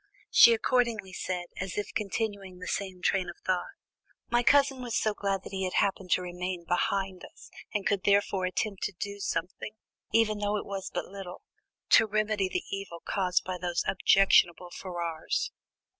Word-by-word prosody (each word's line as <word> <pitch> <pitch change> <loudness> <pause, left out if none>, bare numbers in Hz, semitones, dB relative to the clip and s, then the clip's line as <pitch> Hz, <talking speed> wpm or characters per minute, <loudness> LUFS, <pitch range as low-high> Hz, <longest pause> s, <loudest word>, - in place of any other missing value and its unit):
She 235 - +9
accordingly 225 -5 0
said, 180 -1 -3
as 185 -1 -4
if 205 - -3
continuing 200 -2 -3
the 180 - -8
same 185 -1 -4
train 190 -2 +1
of 175 - -7
thought: 185 - -1 0.6
"My 240 0 +4
cousin 270 +2 +4
was 240 -2 -2
so 215 - +1
glad 195 -2 -2
that - - -9
he 190 -1 -3
had 185 - -2
happened 195 -2 +1
to 180 - +1
remain 180 0 -4
behind 190 +1 0
us, - - -14 0.2
and 210 -2 -2
could 200 -2 +1
therefore 200 -2 +2
attempt 195 +2 -2
to 210 - -3
do 200 0 -4
something, 185 +3 -3 0.4
even 215 -2 +3
though 205 0 0
it - - -5
was 195 -1 -5
but - - -3
little, 190 -2 -9 0.5
to 220 - +7
remedy 215 -2 0
the 180 - -2
evil 195 -4 -5
caused 180 0 0
by 185 -1 -4
those 175 0 -1
objectionable 180 -2 +4
Ferrars." 170 -4 -3
195 Hz, 175 wpm, -29 LUFS, 180-210 Hz, 0.6 s, She